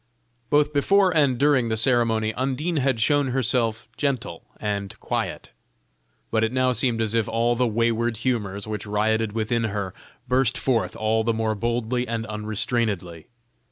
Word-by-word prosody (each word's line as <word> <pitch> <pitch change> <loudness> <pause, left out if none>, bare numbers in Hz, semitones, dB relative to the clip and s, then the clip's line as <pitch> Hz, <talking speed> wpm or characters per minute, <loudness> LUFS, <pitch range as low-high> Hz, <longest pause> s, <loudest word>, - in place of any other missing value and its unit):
Both 150 0 +3
before 185 +5 +3
and 140 -5 +3
during 140 -4 +3
the 110 - 0
ceremony, 115 -2 +2
Undine 135 +7 -1
had 130 -4 +1
shown 145 +4 +3
herself 120 -3 0
gentle 130 -3 -2
and 100 -2 -3
quiet; - - -3 0.8
but 110 - +2
it 110 - +1
now 130 0 +2
seemed 120 -3 +1
as 110 0 -1
if 115 -3 +1
all 115 +1 +1
the 125 +1 +2
wayward 115 +1 0
humors 105 -5 -2
which 105 -1 -5
rioted 110 +1 0
within 115 +1 0
her, 100 -3 -3 0.3
burst 130 0 +2
forth 125 -4 0
all 110 +1 +1
the 115 0 0
more 110 -1 0
boldly 120 +3 -1
and 115 0 -3
unrestrainedly. 105 -5 -2
115 Hz, 155 wpm, -24 LUFS, 110-130 Hz, 0.8 s, Both